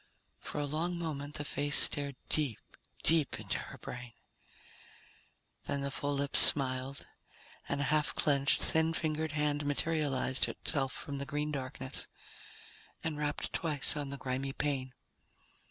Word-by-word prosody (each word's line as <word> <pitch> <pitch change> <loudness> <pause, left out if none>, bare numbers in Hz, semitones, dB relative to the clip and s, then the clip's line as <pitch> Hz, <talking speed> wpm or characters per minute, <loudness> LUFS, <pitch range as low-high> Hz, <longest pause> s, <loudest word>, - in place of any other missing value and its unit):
For - - -7
a 145 - 0
long 165 +5 -2
moment 150 -3 -5
the 145 - -2
face 145 +1 0
stared 140 -2 +1
deep, 145 -8 0 0.5
deep 160 -3 +3
into - - -3
her - - -9
brain. 125 -2 -8 1.5
Then 140 - -2
the 140 0 -3
full 145 +1 -2
lips 140 0 +4
smiled 130 -1 +6 0.6
and 140 - -1
a - - +1
half 150 +2 +1
clenched, 140 -2 +2
thin 160 0 +1
fingered 155 -1 -2
hand 150 -1 0
materialized 145 -3 0
itself 135 -3 +1
from 140 -1 -6
the 140 - -4
green 150 0 -2
darkness 130 -1 -2 1.0
and 160 -2 -2
rapped 145 -7 -3
twice 150 +4 +1
on 145 -2 -4
the 140 - -6
grimy 135 +1 -3
pane. 130 -4 -2
145 Hz, 140 wpm, -32 LUFS, 135-150 Hz, 1.5 s, smiled